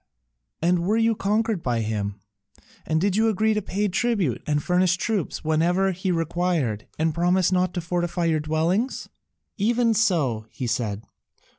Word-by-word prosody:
"And 175 +1 +3
were 195 +6 +1
you 230 0 +3
conquered 210 -1 0
by 120 -4 0
him, 105 -2 -2 0.7
and 160 0 +1
did 195 +2 +1
you 225 +1 +3
agree 220 +1 +2
to 215 - 0
pay 205 +2 -1
tribute 190 - 0
and 150 -1 0
furnish 180 0 +2
troops 205 -4 -2
whenever 175 +5 +2
he 185 +1 -2
required, 165 - -1
and 160 0 +1
promise 180 +2 +2
not 185 0 +2
to 175 - -1
fortify 175 0 -1
your 160 -2 +2
dwellings?" 165 - -1 0.5
"Even 230 +2 +2
so," 155 - +1
he 130 - -5
said. 110 -3 -2
175 Hz, 155 wpm, -24 LUFS, 155-200 Hz, 0.7 s, And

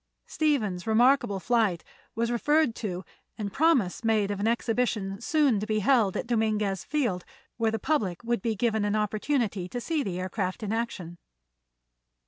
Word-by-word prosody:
Stephen's 220 - 0
remarkable 225 -2 +3
flight 215 -5 +1 0.3
was 230 +1 0
referred 295 +2 +2
to 185 -5 -5 0.3
and 205 -3 -4
promise 270 - +2
made 215 -3 +2
of 200 - -3
an 205 - 0
exhibition 225 -4 -1
soon 285 -5 +2
to 210 - -4
be 215 -1 0
held 215 -3 +3
at - - -3
Dominguez 215 -5 0
Field 240 -12 -1 0.3
where 225 -1 +2
the 225 - -1
public 210 - -1
would 235 -2 -1
be 225 0 -1
given 220 0 0
an 205 0 0
opportunity 215 -2 -1
to 245 - -4
see 315 +5 -1
the 185 -7 -3
aircraft 185 +2 -3
in 210 +1 -2
action. 190 -7 -4
220 Hz, 160 wpm, -27 LUFS, 195-240 Hz, 0.3 s, remarkable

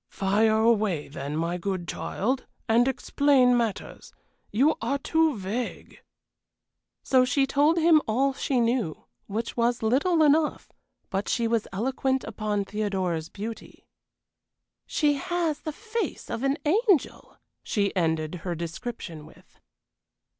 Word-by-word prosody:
"Fire 215 +3 +2
away, 215 -8 +2
then, 145 +1 -5
my 170 +2 -1
good 185 -1 -3
child, 255 +6 -2 0.2
and 235 +3 +4
explain 265 -1 +3
matters. 230 -4 -3 0.4
You 275 +9 +3
are 280 - 0
too 320 -1 +1
vague!" 205 +6 -5 1.0
So 260 -1 +4
she 255 +2 +2
told 290 +5 +3
him 325 -2 +5
all 265 +5 +1
she 265 -1 -1
knew 230 -8 0 0.2
which 225 +3 -4
was 235 0 +1
little 305 +9 +3
enough; 300 +1 +2 0.4
but 195 +1 -2
she 235 -2 +1
was 225 -1 0
eloquent 265 +5 -1
upon 210 -2 -2
Theodora's 190 -5 -2
beauty. 220 +3 -8 1.0
"She 295 -2 +2
has 335 0 -1
the 310 - -5
face 450 +7 -4
of 230 - -3
an 275 +2 +1
angel," 390 - +1 0.2
she 200 -2 -1
ended 160 -3 0
her 175 0 -3
description 170 -1 -6
with. - - -20
235 Hz, 125 wpm, -26 LUFS, 195-280 Hz, 1.0 s, him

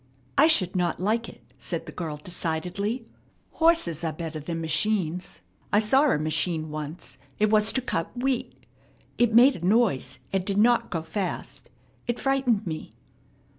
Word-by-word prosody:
"I - - +6
should 190 - +5
not 175 -1 0
like 220 +5 0
it," - - -15 0.2
said 165 +6 -4
the 155 - -8
girl 155 -2 -5
decidedly. 180 - -3 0.5
"Horses 320 - +2
are 165 - 0
better 160 0 -6
than 165 +3 -4
machines. 180 +1 -1 0.3
I 205 - +4
saw 265 +8 +4
a - - +2
machine 155 +1 -1
once. 155 +3 -7 0.2
It 215 0 +2
was 215 0 +5
to 260 - 0
cut 165 -9 -2
wheat. 255 0 -2 0.5
It 235 -2 +3
made 255 +3 +7
a 170 - -11
noise, 200 - +1 0.2
and 190 -1 +1
did 195 +1 -2
not 235 +2 +3
go 165 -2 -3
fast. 180 +3 -5 0.4
It 240 0 -1
frightened 265 -6 +1
me." 160 -3 -6
185 Hz, 160 wpm, -26 LUFS, 160-235 Hz, 0.5 s, made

